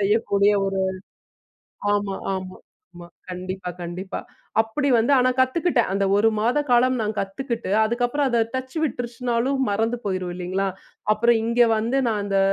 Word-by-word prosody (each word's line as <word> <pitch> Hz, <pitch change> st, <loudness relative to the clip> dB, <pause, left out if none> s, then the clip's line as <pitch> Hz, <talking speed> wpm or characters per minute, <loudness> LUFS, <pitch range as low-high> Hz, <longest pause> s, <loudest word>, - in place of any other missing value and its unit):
செய்யக்கூடிய 200 Hz, 0 st, +3 dB
ஒரு 195 Hz, 0 st, -1 dB, 1.1 s
ஆமா, 200 Hz, -1 st, -1 dB, 0.2 s
ஆமா. 185 Hz, 0 st, -6 dB, 0.4 s
ஆமா. 175 Hz, 0 st, -10 dB, 0.2 s
கண்டிப்பா, 185 Hz, 0 st, -5 dB
கண்டிப்பா. 180 Hz, +3 st, -5 dB, 0.4 s
அப்பிடி 280 Hz, +6 st, -2 dB
வந்து 235 Hz, +5 st, +2 dB
ஆனா 255 Hz, 0 st, +4 dB
கத்துக்கிட்டேன். 260 Hz, -, +2 dB
அந்த 195 Hz, 0 st, +1 dB
1 220 Hz, +2 st, +4 dB
மாத 240 Hz, +6 st, +2 dB
காலம் 250 Hz, +1 st, +4 dB
நான் 215 Hz, 0 st, -2 dB
கத்துக்கிட்டு 230 Hz, +1 st, -3 dB
அதுக்கப்பறம் 245 Hz, +5 st, 0 dB
அத 235 Hz, -2 st, +3 dB
டச் 260 Hz, +4 st, -4 dB
விட்டுருச்சினாலும் 245 Hz, +1 st, -1 dB
மறந்து 225 Hz, +4 st, 0 dB
போயிரும் 185 Hz, -2 st, -2 dB
இல்லேங்களா! 185 Hz, +2 st, -1 dB, 0.5 s
அப்புறம் 235 Hz, +2 st, +3 dB
இங்க 235 Hz, +1 st, 0 dB, 0.2 s
வந்து 235 Hz, +5 st, 0 dB
நான் 210 Hz, -2 st, -1 dB
அந்த 195 Hz, -1 st, 0 dB
225 Hz, 140 wpm, -23 LUFS, 195-245 Hz, 1.1 s, ஆனா